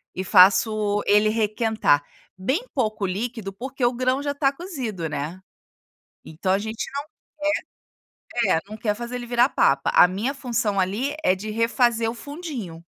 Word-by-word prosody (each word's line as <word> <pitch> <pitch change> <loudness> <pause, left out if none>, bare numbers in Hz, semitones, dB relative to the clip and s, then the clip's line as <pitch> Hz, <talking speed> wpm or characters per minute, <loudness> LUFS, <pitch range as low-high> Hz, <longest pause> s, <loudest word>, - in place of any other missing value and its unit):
e 185 - -2
faço 205 +2 +4
ele 210 +1 +4
requentar. 215 -8 +1 0.3
Bem 265 - -1
pouco 215 -6 -1
líquido, 205 +1 -4
porque 255 +4 -3
o 245 - +2
grão 255 +2 0
já 285 - -1
está 280 -1 +1
cozido, 265 - -5
né. 155 +4 -4 0.8
Então 165 +4 -3
a 190 - +4
gente 220 +1 -4
não 280 +1 -3 1.3
quer, 230 -8 +1
eh, - - 0
não 215 - -7
quer 215 -1 -1
fazer 240 +3 -6
ele 245 -1 -5
virar 240 +1 +3
papa, - - +2
a - - +8
minha 220 +10 -2
função 235 -6 -1
ali 210 +10 0
é 185 - +4
de 210 +3 -6
refazer 230 +1 +1
o - - -7
fundinho. 285 - -7
225 Hz, 165 wpm, -23 LUFS, 195-255 Hz, 1.3 s, a